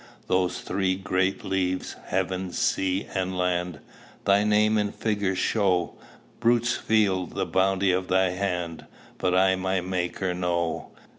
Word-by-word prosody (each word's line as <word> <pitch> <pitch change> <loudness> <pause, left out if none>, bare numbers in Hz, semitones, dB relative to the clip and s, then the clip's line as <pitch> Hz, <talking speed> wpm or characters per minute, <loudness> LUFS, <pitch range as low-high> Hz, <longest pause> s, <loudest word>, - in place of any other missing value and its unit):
"Those 90 -1 0
three 95 -2 0
great 95 0 -1
leaves, 95 -1 -1
heaven, 95 0 -1
sea, 95 +1 0
and 95 -1 -2
land, 90 -1 -1 0.4
Thy 100 +1 +4
name 105 +1 +3
in 105 -1 0
figures 100 -4 -1
show; 95 -3 +1 0.5
Brutes 120 0 +2
feel 100 -5 +1
the - - -3
bounty 95 0 +2
of 90 0 0
thy 95 0 +2
hand, 90 -3 -3 0.3
But 90 -1 +1
I 95 0 +4
my 95 0 0
Maker 90 0 -2
know. 85 -2 -1
95 Hz, 135 wpm, -26 LUFS, 90-100 Hz, 0.5 s, Thy